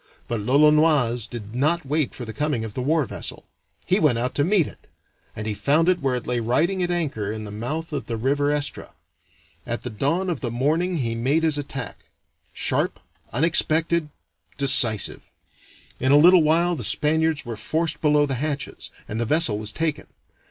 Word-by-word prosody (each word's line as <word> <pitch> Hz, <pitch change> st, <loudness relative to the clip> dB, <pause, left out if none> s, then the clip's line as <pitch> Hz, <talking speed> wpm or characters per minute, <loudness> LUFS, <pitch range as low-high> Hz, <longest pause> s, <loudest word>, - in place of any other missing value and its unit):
But 120 Hz, -2 st, -2 dB
l'Olonoise 140 Hz, -1 st, +3 dB
did 110 Hz, -3 st, -8 dB
not 155 Hz, +6 st, +1 dB
wait 150 Hz, +1 st, -1 dB
for 120 Hz, -, -6 dB
the 110 Hz, -, -7 dB
coming 145 Hz, -5 st, -2 dB
of 110 Hz, -, -8 dB
the 125 Hz, -, -4 dB
war 150 Hz, +3 st, +1 dB
vessel; -, -, -4 dB, 0.4 s
he 185 Hz, +3 st, +2 dB
went 150 Hz, -, +3 dB
out 125 Hz, +2 st, -2 dB
to 145 Hz, -, +1 dB
meet 180 Hz, 0 st, +3 dB
it, -, -, -13 dB, 0.5 s
and 105 Hz, -, -5 dB
he 110 Hz, -, -2 dB
found 145 Hz, -, +1 dB
it 185 Hz, -1 st, +3 dB
where 135 Hz, -2 st, 0 dB
it 125 Hz, -, -5 dB
lay 125 Hz, -1 st, -1 dB
riding 155 Hz, +12 st, 0 dB
at 175 Hz, -, 0 dB
anchor 140 Hz, -, -2 dB
in 110 Hz, 0 st, -6 dB
the 105 Hz, -, -8 dB
mouth 150 Hz, +10 st, -5 dB
of 140 Hz, -, -4 dB
the 115 Hz, -, -3 dB
river 140 Hz, +5 st, 0 dB
Estra. 145 Hz, -1 st, -3 dB, 0.7 s
At 120 Hz, 0 st, -4 dB
the 125 Hz, -, -5 dB
dawn 155 Hz, -, -1 dB
of 160 Hz, -, -3 dB
the 120 Hz, -, -3 dB
morning 155 Hz, +9 st, 0 dB
he 115 Hz, -5 st, -2 dB
made 135 Hz, +8 st, 0 dB
his 155 Hz, -2 st, +2 dB
attack 135 Hz, -3 st, -7 dB, 0.5 s
sharp, -, -, -1 dB, 0.3 s
unexpected, 160 Hz, +3 st, +2 dB, 0.5 s
decisive. 120 Hz, -6 st, +4 dB, 0.8 s
In 130 Hz, +1 st, +1 dB
a 145 Hz, -, +7 dB
little 175 Hz, +3 st, +7 dB
while 170 Hz, +3 st, +2 dB
the -, -, -6 dB
Spaniards 160 Hz, 0 st, 0 dB
were 115 Hz, -1 st, -5 dB
forced 160 Hz, +8 st, -2 dB
below 150 Hz, -1 st, +3 dB
the 140 Hz, -, -3 dB
hatches, 145 Hz, -3 st, -4 dB, 0.2 s
and 110 Hz, +2 st, -3 dB
the -, -, 0 dB
vessel 145 Hz, -9 st, +3 dB
was 105 Hz, 0 st, -4 dB
taken. 160 Hz, -2 st, -3 dB
145 Hz, 185 wpm, -23 LUFS, 120-160 Hz, 0.8 s, a